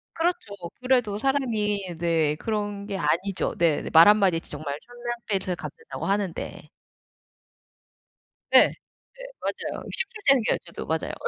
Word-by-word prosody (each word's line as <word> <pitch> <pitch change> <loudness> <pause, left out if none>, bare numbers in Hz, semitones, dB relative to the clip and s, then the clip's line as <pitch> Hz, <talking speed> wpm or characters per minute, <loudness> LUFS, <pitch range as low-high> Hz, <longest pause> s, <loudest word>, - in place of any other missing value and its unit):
그렇죠. 335 - -1 0.3
그래도 245 -5 +2
사람이 210 -8 0
네. 165 -3 +2
그런 205 +2 -3
게 200 -2 -4
아니죠. 190 +2 0
네. 170 -5 +2
말 165 +3 +9
한마디에 195 -5 +5
진짜 150 - -9
정말 145 -1 -4
천냥 240 0 -5
빚을 190 -3 -1
갚는다고 150 -1 -7
하는데. 195 -3 -2 1.8
네. - - +8
네. - - -7 0.7
맞아요. - - -4
심술재 470 -2 -4
생겨요, 240 -5 +2
저도. - - -7
맞아요. - - -2
200 Hz, 280 characters per minute, -25 LUFS, 170-235 Hz, 1.8 s, 말